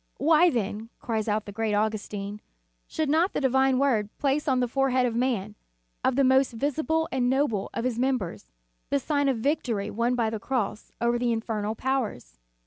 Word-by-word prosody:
" - - -44
Why 320 +3 +5
then," 220 - -3
cries 220 -2 -2
out 215 0 0
the 205 - -7
great 215 0 -1
Augustin, 210 -1 -2 0.5
"should 315 - -2
not 325 +6 +2
the - - 0
Divine 265 -1 +3
Word 240 -7 +2
place 285 +2 0
on 260 -2 +3
the 250 - +1
forehead 260 0 +2
of 235 -2 -1
man, 235 -5 0 0.5
on 260 - +2
the 275 - +3
most 265 0 +4
visible 315 +6 0
and 250 -2 +1
noble 260 -7 0
of 230 - -3
his 245 -2 -1
mem 260 +1 +2
bers, 185 -7 -7 0.4
the 280 - +2
sign 285 0 +1
of 260 - +1
victory 225 -5 -1
won 235 +4 0
by 230 -3 0
the 220 - -3
cross 220 -3 -3
over 235 0 +1
the 245 -1 +1
infernal 220 -2 -2
powers." 225 - -3
245 Hz, 195 wpm, -26 LUFS, 215-270 Hz, 0.5 s, Why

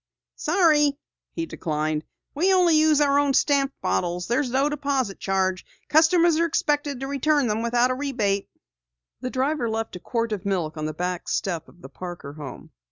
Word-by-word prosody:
"Sorry," 305 -4 +3 0.4
he 330 - -3
declined. 155 - -2 0.3
"We 325 +6 +1
use 380 - +5 0.4
only 295 - +4
our 280 0 +3
own 285 -2 +2
stamped 280 -1 +2
bottles. 175 0 -1
There's 250 +3 0
no 265 +3 +2
deposit 275 -7 -1
charge. 190 -1 0 0.3
Customers 330 +1 +4
are 335 - +3
expected 290 -4 -1
to 270 - -3
return 280 +1 +1
them 215 -1 0
without 240 +2 +2
rebate." 225 -8 -1 0.7
The 255 - -4
driver 265 -1 -1
left 225 -2 -3
a - - -6
quart 230 +3 -2
of 205 -4 -3
milk 180 -6 -1
on 155 -1 -3
the 155 - -4
back 180 +1 -3
doorstep 175 -5 -2
of 175 - -21
the - - -9
Parker 175 -6 -8
home. 145 -4 -9
250 Hz, 170 wpm, -24 LUFS, 185-290 Hz, 0.7 s, use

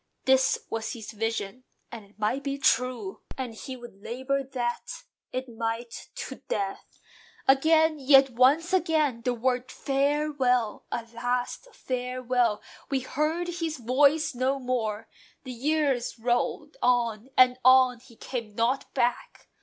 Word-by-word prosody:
This 265 0 +4
was 225 0 -3
his 220 -3 -8
vision; 225 +1 -3 0.3
and 230 -2 -8
it 200 +1 -23
might 220 +6 -1
be 275 0 -2
true; 250 -7 0 0.2
And 255 -3 -4
he 255 +4 -7
would 240 -5 -13
labour 260 +5 -2
that 245 -3 -4 0.3
it 255 +1 -3
might, 230 0 -5
to - - -6
death! 195 -1 -4 0.5
Again, 315 +3 +4
yet 270 -1 +6
once 275 +9 +3
again, 315 -9 +2
the 245 +1 0
word, 250 +1 -1
"Farewell!" 275 -4 0
A 230 -1 -3
last 245 - -2
farewell: 250 -3 -1 0.3
we 270 -2 0
heard 310 +6 -1
his 325 -2 -2
voice 275 +6 +3
no 260 +2 0
more. 230 -5 -2 0.4
The 260 - -7
years 275 -1 0
rolled 240 - -1
on, 235 -1 +1
and 255 0 +6
on: 255 -1 +6
he 240 -1 -18
came 230 -4 -6
not 240 +4 0
back. 240 0 -1
250 Hz, 135 wpm, -27 LUFS, 235-275 Hz, 0.5 s, yet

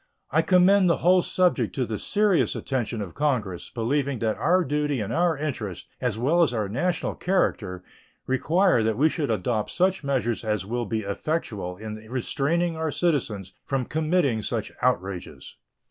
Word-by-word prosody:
I 160 - +4
commend 185 +2 +5
the 170 - +3
whole 180 +1 +6
subject 180 0 +1
to 130 -3 0
the 110 -2 -4
serious 205 -4 +2
attention 120 -5 -2
of 90 - -9
Congress, 120 - -1
believing 135 +3 -1
that 110 -1 0
our 180 +3 +2
duty 145 -1 -1
and 105 - -3
our 170 -2 +2
interest, 120 - -4 0.2
as 120 -4 -1
well 150 +9 +2
as 150 -7 +2
our 105 -3 -1
national 170 - -1
character, 100 - -1 0.4
require 160 +3 +2
that 110 -1 0
we 155 +4 +4
should 150 -3 -2
adopt 110 -5 -1
such 185 -1 +1
measures 125 -5 -1
as 105 -4 -1
will 120 +2 -2
be 110 +1 -1
effectual 100 - -3
in 110 +1 -6
restraining 160 +7 0
our 160 0 -1
citizens 115 - -1
from 135 -2 -1
committing 155 -6 +1
such 110 0 -3
outrages. 95 -7 -2
135 Hz, 160 wpm, -25 LUFS, 110-165 Hz, 0.4 s, whole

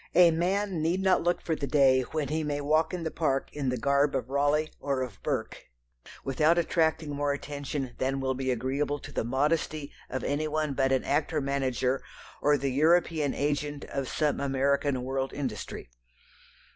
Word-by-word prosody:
A 175 -2 +8
man 185 +2 0
need 170 +4 +1
not 190 -1 +4
look 175 +1 0
for 160 - 0
the 140 - -3
day 130 -1 +5
when 145 +2 -3
he 155 +1 -1
may 145 -1 -2
walk 155 +3 +2
in 180 -2 -4
the 160 - -2
parks 135 -4 -1
in 140 -3 -1
the 125 - -1
garb 140 +3 +2
of 130 -1 -3
Raleigh 145 +2 +2
or 135 -2 -1
of 115 -6 -8
Burke - - -3 0.6
without 155 +5 +3
attracting 160 -2 +1
more 145 0 0
attention 140 -2 -4
than 135 +1 0
will 130 0 0
be 130 0 -3
agreeable 135 +4 -1
to - - -10
the - - -1
modesty 145 +4 0 0.2
of 130 -1 -3
any 145 +2 0
one 155 -1 -1
but 135 0 +1
an 130 - +2
actor 150 +2 0
manager 135 -2 0 0.4
or 145 0 +4
the 135 0 -1
European 155 0 +2
agent 145 0 -1
of 135 -2 -3
some 150 -2 0
American 140 -1 +1
world 135 +1 -2
industry. 130 - -5
145 Hz, 180 wpm, -28 LUFS, 135-155 Hz, 0.6 s, A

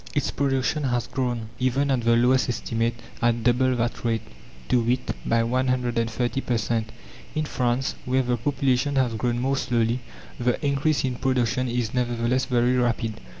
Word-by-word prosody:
its 145 -1 +1
production 135 +2 0
has 120 -3 0
grown, 125 -3 -2
even 135 +2 +1
at 130 -2 +2
the 115 0 +3
lowest 125 +3 +3
estimate, 115 0 -1 0.3
at 120 -1 +2
double 125 +2 +3
that 120 0 -2
rate 115 -2 0 0.4
to 125 - +3
wit, 125 +2 0 0.2
by 115 0 +3
130 125 0 0
per 120 -3 0
cent. 110 +1 -1 0.4
In 155 0 0
France, 125 -2 0
where 130 +1 +2
the 125 0 +1
population 135 +2 0
has 130 -3 +2
grown 120 +2 -1
more 135 +3 0
slowly, 120 -1 +1 0.4
the 125 0 +1
increase 140 0 +1
in 125 -2 -2
production 130 -1 +1
is 120 -2 -1
nevertheless 125 +1 0
very 125 -1 +2
rapid. 115 -2 0
125 Hz, 160 wpm, -25 LUFS, 120-130 Hz, 0.4 s, the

